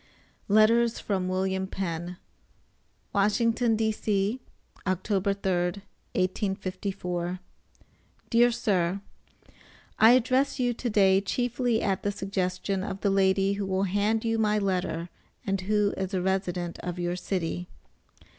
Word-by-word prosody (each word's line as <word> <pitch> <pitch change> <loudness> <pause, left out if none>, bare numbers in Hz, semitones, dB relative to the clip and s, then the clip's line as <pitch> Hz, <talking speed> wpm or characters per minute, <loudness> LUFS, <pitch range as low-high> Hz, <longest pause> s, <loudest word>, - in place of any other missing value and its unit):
LETTERS 225 +3 +4
FROM 190 -3 -1
WILLIAM 190 0 -1
PENN. 175 -2 -4 1.0
WASHINGTON, 225 +3 +2
D.C., 215 0 0 0.5
Oct. 185 0 0
3, 210 - -2
1854 185 -1 -2 0.9
DEAR 240 +1 +5
SIR: 190 -4 0 1.0
I 225 +2 +8
address 255 +3 +2
you 245 -1 +1
to 240 +1 -3
day 195 -2 +4
chiefly 245 +2 0
at 195 -2 0
the 205 - -1
suggestion 195 -1 -2
of 195 -1 -5
the 200 - +2
Lady 195 0 +3
who 200 -1 -3
will 190 0 0
hand 205 +4 +1
you 225 0 +1
my 215 -1 +2
letter, 185 -4 -1 0.4
and 195 -2 -1
who 205 +1 +1
is 190 0 -3
a 185 - 0
resident 180 -2 -1
of 180 0 -5
your 175 0 -1
city. 180 -1 -3
195 Hz, 120 wpm, -27 LUFS, 185-215 Hz, 1.0 s, I